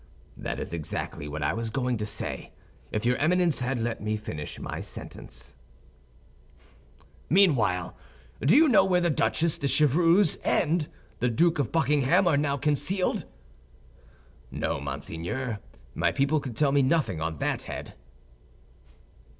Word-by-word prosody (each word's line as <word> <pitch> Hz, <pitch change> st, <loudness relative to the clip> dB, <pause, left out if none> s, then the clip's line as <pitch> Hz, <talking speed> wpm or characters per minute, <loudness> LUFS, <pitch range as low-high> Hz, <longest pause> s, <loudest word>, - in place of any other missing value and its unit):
"That -, -, -4 dB
is -, -, -5 dB
exactly 75 Hz, -2 st, -4 dB
what 75 Hz, +1 st, -4 dB
I -, -, +1 dB
was 115 Hz, 0 st, -3 dB
going 125 Hz, +1 st, -1 dB
to 105 Hz, 0 st, -3 dB
say, -, -, -4 dB, 0.4 s
if 105 Hz, +1 st, -2 dB
your 125 Hz, +1 st, +2 dB
Eminence 175 Hz, 0 st, +2 dB
had 125 Hz, +1 st, -1 dB
let 115 Hz, 0 st, -2 dB
me 105 Hz, +1 st, -1 dB
finish 75 Hz, -8 st, -6 dB
my -, -, -5 dB
sentence." 65 Hz, -1 st, -10 dB, 1.7 s
"Meanwhile, 135 Hz, -, +3 dB, 0.5 s
do 160 Hz, -, +5 dB
you 315 Hz, +3 st, +7 dB
know 250 Hz, -, +6 dB
where 180 Hz, -2 st, +2 dB
the 175 Hz, -2 st, +1 dB
Duchesse 145 Hz, +6 st, +1 dB
de 140 Hz, -, 0 dB
Chevreuse 160 Hz, +6 st, +4 dB
and 160 Hz, -2 st, +1 dB, 0.3 s
the 125 Hz, -, +1 dB
Duke 165 Hz, +7 st, +2 dB
of 130 Hz, -6 st, -1 dB
Buckingham 160 Hz, +3 st, +3 dB
are 165 Hz, -, +4 dB
now 140 Hz, 0 st, +1 dB
concealed?" 160 Hz, +6 st, 0 dB, 1.2 s
"No, -, -, -2 dB
monseigneur; 85 Hz, -, -4 dB, 0.3 s
my -, -, +1 dB
people 145 Hz, +3 st, +1 dB
could 125 Hz, -5 st, -7 dB
tell 145 Hz, -2 st, +3 dB
me 140 Hz, 0 st, +4 dB
nothing 130 Hz, -, +1 dB
on 80 Hz, 0 st, -2 dB
that -, -, -1 dB
head." -, -, -6 dB
135 Hz, 140 wpm, -27 LUFS, 110-165 Hz, 1.7 s, you